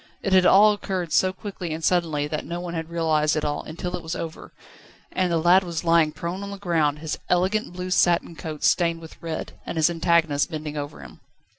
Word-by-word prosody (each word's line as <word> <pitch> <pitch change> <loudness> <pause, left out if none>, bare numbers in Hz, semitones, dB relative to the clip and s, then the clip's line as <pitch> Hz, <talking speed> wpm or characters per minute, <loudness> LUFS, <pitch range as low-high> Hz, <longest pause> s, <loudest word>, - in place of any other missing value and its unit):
It 195 - 0
had 185 -1 +6
all 210 +2 +7
occurred 185 -5 -4
so 185 +3 +4
quickly 185 -3 -6
and 160 +1 -5
suddenly 160 -4 +1
that 150 0 -3
no 170 +1 -5
one 175 -1 -5
had 165 -1 -4
realised 160 -2 +1
it 155 - -1
all, 145 0 -1
until 175 +3 -5
it 180 - -6
was 165 +1 -5
over, 165 -1 -7 0.6
and 185 -1 0
the 170 - +2
lad 175 +4 +5
was 170 -2 -4
lying 165 -2 +4
prone 170 +5 -5
on 200 - -6
the 200 - -6
ground, 165 -6 +1
his 155 0 -4
elegant 185 +4 +1
blue 180 +1 -5
satin 175 -2 +2
coat 155 -3 -7
stained 170 -2 +2
with 160 -1 -13
red, 165 -1 -4
and - - -5
his 160 +2 +3
antagonist 165 -3 +2
bending 155 -2 -5
over 145 0 -6
him. - - -13
170 Hz, 220 wpm, -24 LUFS, 160-180 Hz, 0.6 s, all